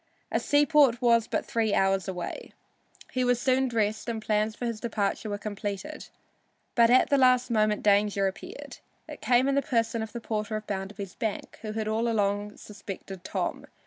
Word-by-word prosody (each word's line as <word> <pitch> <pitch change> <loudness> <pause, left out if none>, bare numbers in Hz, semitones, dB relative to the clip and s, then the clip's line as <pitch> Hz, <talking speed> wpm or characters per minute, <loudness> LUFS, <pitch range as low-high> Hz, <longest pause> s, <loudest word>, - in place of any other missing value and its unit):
A - - +1
seaport 290 -4 +4
was 230 -2 +3
but - - -2
three 220 -3 0
hours 195 0 +2
away. 180 -2 -6 0.6
He 255 - 0
was 245 -1 +2
soon 260 +1 +2
dressed 220 -1 -1
and 225 -1 -2
plans 215 0 0
for 245 - -5
his 230 -2 -3
departure 215 -2 -2
were 205 - -2
completed. 205 +7 -5 0.7
But 235 -2 +5
at 255 +3 +4
the 280 - +4
last 255 -1 +4
moment 215 -2 +2
danger 205 -1 +3
appeared. 190 0 -6 0.3
It - - -9
came 250 +1 +3
in 275 - +2
the 280 - +3
person 230 -3 0
of 220 -1 -5
the 235 - -5
porter 215 -1 -3
of 215 0 -4
Bounderby's 195 -1 -5
bank, 220 -3 -4
who 215 -1 -5
had 220 -1 -2
all 220 +2 0
along 205 -1 -1
suspected 195 -2 -9
Tom. - - -3
220 Hz, 180 wpm, -27 LUFS, 205-240 Hz, 0.7 s, But